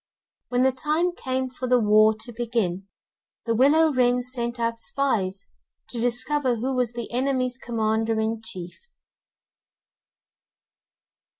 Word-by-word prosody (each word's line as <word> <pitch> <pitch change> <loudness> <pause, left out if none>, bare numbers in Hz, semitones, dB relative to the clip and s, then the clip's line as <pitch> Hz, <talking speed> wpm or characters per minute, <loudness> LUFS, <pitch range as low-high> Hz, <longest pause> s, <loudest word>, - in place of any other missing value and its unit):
When 250 0 +2
the 265 - +4
time 305 +7 0
came 260 -4 -3
for 255 0 -5
the 250 0 +4
war 215 0 +5
to 240 - -6
begin, 220 -6 -2 0.6
the 230 - +1
willow 295 +6 +4
wren 250 -1 +2
sent 240 -1 -3
out 230 0 -1
spies 210 -8 -1 0.4
to 235 - -3
discover 245 +2 +1
who 255 +4 -2
was 245 -2 0
the 235 -1 -6
enemy's 255 0 0
commander 225 -1 0
in 220 0 -1
chief. 185 -6 -7
240 Hz, 125 wpm, -24 LUFS, 225-260 Hz, 0.6 s, war